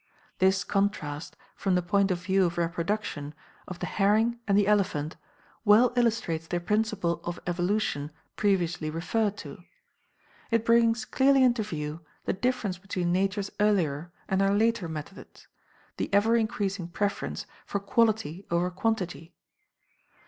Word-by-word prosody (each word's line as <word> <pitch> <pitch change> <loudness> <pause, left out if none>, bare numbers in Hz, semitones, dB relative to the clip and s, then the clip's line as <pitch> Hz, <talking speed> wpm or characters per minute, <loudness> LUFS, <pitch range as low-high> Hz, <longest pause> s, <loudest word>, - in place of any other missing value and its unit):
This 190 +1 +3
contrast, 170 -7 -2 0.2
from 190 -2 0
the 180 - +1
point 200 +3 +2
of 175 -2 -2
view 190 0 +3
of 170 0 -2
reproduction, 170 -3 -2 0.3
of 185 - -6
the - - -4
herring 220 +4 +2
and 200 -1 +3
the 205 - +4
elephant, 195 -7 +1 0.5
well 225 +3 +5
illustrates 215 -9 0
the 175 - -1
principle 200 -2 0
of 175 0 -4
evolution 175 -4 -1 0.3
previously 175 -6 0
referred 205 +6 -1
to. 155 0 -9 0.9
It 230 -1 +1
brings 230 -1 +3
clearly 270 0 +4
into 240 -2 +3
view 155 -5 -4 0.2
the - - +1
difference 205 -3 -1
between 185 -2 -2
Nature's 195 +2 0
earlier 175 -6 +1 0.2
and 190 0 +1
her 195 +1 +3
later 220 -3 +2
methods 160 +4 -9 0.5
the - - -3
ever 205 +3 +4
increasing 205 -5 -1
preference 200 +3 -2 0.2
for 200 - -1
quality 205 -4 +1
over 175 +1 +1
quantity. 185 -4 -2
195 Hz, 135 wpm, -28 LUFS, 175-215 Hz, 0.9 s, well